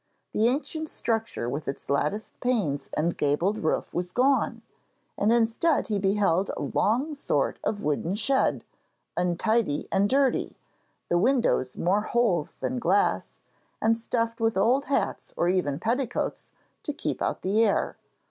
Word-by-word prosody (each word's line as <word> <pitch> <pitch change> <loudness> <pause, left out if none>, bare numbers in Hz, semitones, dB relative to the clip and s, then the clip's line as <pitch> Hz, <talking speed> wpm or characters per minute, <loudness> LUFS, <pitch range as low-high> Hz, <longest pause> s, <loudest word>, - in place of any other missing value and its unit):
The 220 +2 +3
ancient 310 +4 -1
structure 225 - -2
with 145 +5 -4
its 135 - -5
latticed 150 +10 -1
panes 210 - -1
and 165 +3 +1
gabled 170 +9 +1
roof 155 - -1
was 180 0 -2
gone, 265 +4 +1 0.5
and 210 - +2
instead 235 +8 +2
he 210 -2 0
beheld 195 -2 +2
a - - -4
long 255 +9 +1
sort 285 - -1
of 205 - -2
wooden 150 +5 0
shed, 265 +6 +2 0.5
untidy 180 -1 +1
and 200 +1 +2
dirty, 270 -1 +1 0.5
the 175 - +3
windows 230 - +2
more 190 +4 +2
holes 215 -8 0
than 255 - -1
glass, 200 -1 +1 0.5
and 225 +1 +3
stuffed 230 0 -2
with 225 -3 +1
old 245 +8 +3
hats 280 - -2
or 175 - +2
even 180 -7 +1
petticoats 235 - -2 0.3
to 295 - -4
keep - - -3
out - - -2
the 205 +4 +3
air. 205 -3 +1
215 Hz, 145 wpm, -26 LUFS, 175-240 Hz, 0.5 s, The